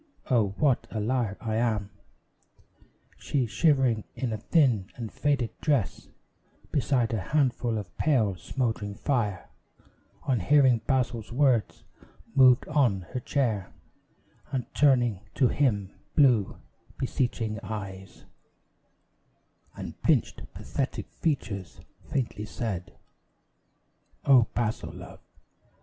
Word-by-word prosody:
O, 105 -6 +2
what 140 -5 +2
a 110 - -4
liar 115 -2 0
I 110 -1 -2
am!" 110 -4 0 1.3
She, 135 -4 0
shivering 130 -4 +2
in 125 -4 -2
a - - -2
thin 120 - +2
and 115 -3 -6
faded 140 -6 0
dress 140 - 0 0.6
Beside 125 -5 +1
a 110 - 0
handful 125 - 0
of 100 -4 -7
pale, 115 -11 +2
smouldering 110 -1 -3
fire, 105 -9 -1 0.8
On 130 -5 +1
hearing 130 +3 +4
Basil's 125 -5 0
words, 125 -3 +2 0.5
moved 130 -2 +6
on 130 -11 +2
her 125 - -1
chair, 115 -7 -1 0.8
And 130 -3 -1
turning 125 -8 +3 0.2
to 130 -4 +3
him 105 -9 +1 0.2
blue, 125 -9 +4 0.4
beseeching 120 -4 -1
eyes, 95 -3 -7 1.5
And - - -8
pinched, - - +1
pathetic - - -4
features, 110 - -3 0.3
faintly 120 -6 -2
said 100 -5 -5 1.3
"O, 130 -5 +6
Basil, 115 -2 -2
love! - - -11
120 Hz, 105 wpm, -27 LUFS, 105-135 Hz, 1.5 s, moved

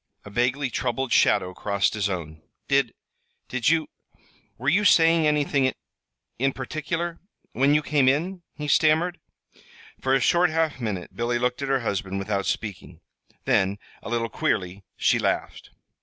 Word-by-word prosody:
A 100 - -10
vaguely 125 +4 0
troubled 125 +2 -1
shadow 90 0 +3
crossed 100 +1 0
his 105 -2 -1
own. 80 -4 -5 0.3
"Did 140 -4 +1 0.5
did 125 -1 +1
you 160 -1 +2 0.7
were 130 - -6
you 190 +8 +4
saying 165 -4 +5
anything 145 -2 +2
in 130 - +1 0.7
in 135 +1 +1
particular, 160 +5 -4 0.3
when 140 +3 +3
you 150 - +2
came 140 -4 +3
in?" 175 +7 -1
he 150 - -5
stammered. 160 +4 +3 0.8
For 130 0 +2
a - - +3
short 175 +7 +3
half 160 -3 0
minute 105 -7 -4
Billy 120 +1 0
looked 125 +2 -1
at 140 - -3
her 135 -2 +2
husband 100 -3 -2
without 100 0 -2
speaking. 95 -5 -4 0.5
Then, 95 +2 +2 0.2
a - - -8
little 115 -1 0
queerly, 95 -1 -2
she - - +2
laughed. - - -2
130 Hz, 155 wpm, -25 LUFS, 105-150 Hz, 0.8 s, saying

